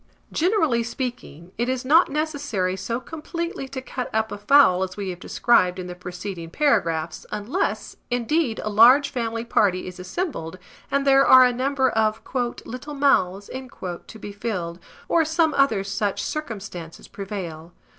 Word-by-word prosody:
Generally 320 - +2
speaking, 235 - -6
it 240 +1 0
is 260 0 -2
not 320 +6 +5
necessary 280 -11 -1
so 210 +6 -3
completely 320 +1 -5
to 265 -1 -7
cut 255 -1 -5
up 220 0 0
a 205 - -4
fowl 205 -6 +5
as 190 +1 -3
we 195 -2 -3
have 175 - -8
described 185 -4 +2
in 185 - -5
the 180 - -6
preceding 180 -1 -7
paragraphs, 170 - 0
unless, 210 - -2
indeed, 245 +1 0
a 215 - -2
large 245 +7 +6
family 230 -2 -3
party 190 -5 +2
is 185 -1 -8
assembled, 185 - -4 0.3
and 280 0 0
there 275 0 +6
are 255 0 +9
a 250 - +2
number 265 +2 +1
of 220 -2 +1 0.5
"little 255 +5 -7
mouths" 200 -9 +2 0.6
to 220 - -11
be 205 - -7
filled, 185 -5 -4 0.3
or 335 - +3
some 320 0 +1
other 230 -8 +2
such 200 0 -2
circumstances 200 - -6
prevail. 180 -5 -7
230 Hz, 155 wpm, -23 LUFS, 185-275 Hz, 0.6 s, are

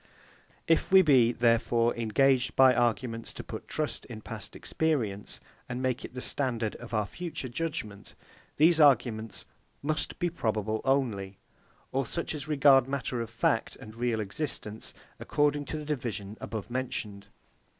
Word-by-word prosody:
If 165 +2 +2
we 190 0 +8
be, 130 -7 +5
therefore, 120 0 +2
engaged 125 +3 +2
by 130 -1 +7
arguments 115 -1 -1
to - - -7
put - - -8
trust 150 -7 -2
in 110 -2 -9
past - - -8
experience, 115 -11 -2 0.3
and 125 0 -3
make 130 -1 -1
it - - -9
the 125 - -4
standard 120 -7 0
of 120 - -11
our 105 -2 +1
future 165 - -5
judgement, 120 -7 -5 0.4
these 160 +2 +5
arguments 115 -6 +3 0.4
must 155 +2 -2
be 175 -1 0
probable 110 -7 -1
only, 110 -8 0 0.5
or 135 -2 0
such 170 - -3
as 150 -1 -5
regard 140 -3 +5
matter 135 -3 -2
of 115 - -5
fact 115 0 0
and 110 - -11
real 115 -1 -1
existence, 110 -1 -4 0.2
according 145 0 +1
to 155 - -4
the 150 - -6
division 115 -8 -4
above 110 +1 -5
mentioned. 105 -6 -4
125 Hz, 150 wpm, -29 LUFS, 110-145 Hz, 0.5 s, we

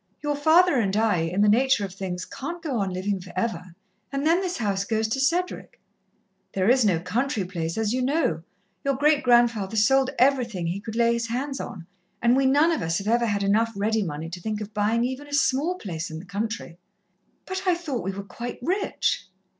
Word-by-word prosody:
Your 295 0 0
father 320 +2 +4
and 200 -3 +1
I, 220 -4 +3
in 165 +5 0
the 210 - +5
nature 235 0 +3
of 190 - -8
things, 185 -2 -5
can't 340 +6 -6
go 285 -8 -2
on 195 -2 -1
livin' 190 +1 -2
for 180 0 -11
ever, 185 -4 -3 0.4
and 275 +1 -2
then 335 +4 +4
this 365 -2 -2
house 200 -4 0
goes 220 +1 0
to 270 - -1
Cedric. 345 +7 -1 0.7
There 190 0 +1
is 255 +1 +5
no 185 -6 +2
country 220 +3 -1
place, 165 -2 -4
as 220 0 0
you 255 - 0
know 255 - +1 0.4
your 275 -1 +1
great 295 +2 +3
grandfather 235 -4 +3
sold 265 +5 +4
everything 245 -8 +2
he 175 +4 -2
could 220 +1 -7
lay 235 0 +3
his 235 0 -2
hands 270 +4 -3
on, 175 -4 -7 0.3
and 235 +1 +3
we 270 0 +3
none 295 +5 +4
of 325 - -1
us 165 +1 0
have 200 - -5
ever 235 +1 +2
had 200 -2 0
enough 225 +3 +2
ready 215 +2 +1
money 165 -2 -4
to 175 0 -7
think 215 +2 -3
of 210 0 -7
buyin' 220 +2 +1
even 260 +3 -5
a 290 - -10
small 295 +3 +2
place 175 - -5
in 160 - -6
the 170 - -9
country." 200 -3 -4 0.7
"But 375 0 -4
I 360 - +4
thought 305 -8 -4
we 195 - -2
were 200 +1 -6
quite 240 +4 -7
rich." 365 - -1
225 Hz, 215 wpm, -25 LUFS, 195-270 Hz, 0.7 s, the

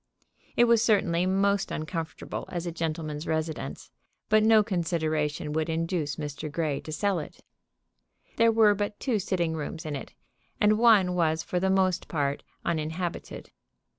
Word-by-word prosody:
It 240 - +5
was 235 -1 +4
certainly 185 -6 +2
most 200 +1 +2
uncomfortable 160 -1 -5
as 175 -1 -4
a 170 - -2
gentleman's 155 -2 -4
residence, 160 0 -3 0.4
but 215 0 +5
no 220 0 +6
consideration 155 -6 -1
would 160 +1 -1
induce 165 -2 -1
Mr. 150 0 -5
Grey 150 -3 -1
to 155 - -8
sell 190 +4 0
it. 150 - -10 0.9
There 230 0 +5
were 220 -2 +5
but 205 0 -3
two 240 -6 0
sitting 175 -3 -1
rooms 160 +1 -5
in 150 -2 -3
it, 135 - -8 0.4
and 210 +1 +4
one 210 -6 +5
was 160 -2 +1
for 180 - -1
the 190 +1 +1
most 190 -1 +2
part 140 -3 -1 0.2
uninhabited. 165 +2 -3
170 Hz, 150 wpm, -27 LUFS, 155-200 Hz, 0.9 s, no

